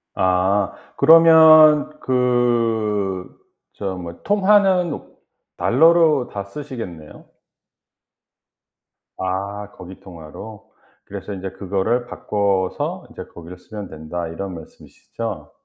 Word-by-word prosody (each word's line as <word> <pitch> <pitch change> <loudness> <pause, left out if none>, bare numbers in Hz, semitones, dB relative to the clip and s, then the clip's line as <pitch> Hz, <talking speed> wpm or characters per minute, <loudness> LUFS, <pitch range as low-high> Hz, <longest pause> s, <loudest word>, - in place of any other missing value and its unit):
아 95 +1 +1 0.2
그러면 155 -2 +6
그 115 -6 -1 0.4
저 95 -2 -5
뭐 85 -2 -9
통화는 195 -4 +2 0.6
달러로 160 -1 +3
다 100 - -4
쓰시겠네요. 100 - -9 1.9
아 100 +2 -4
거기 90 0 -12
통화로. 95 +5 -12 0.3
그래서 105 - -8
인제 95 0 -6
"그거를 100 +6 -2
바꿔서 100 -5 -2
인제 - - -10
거기를 85 +1 -11
쓰면 105 +1 -9
된다." 80 +2 -6
이런 95 +4 -6
말씀 80 -2 -13
이시죠? 105 -10 -8
105 Hz, 200 characters per minute, -20 LUFS, 95-130 Hz, 1.9 s, 그러면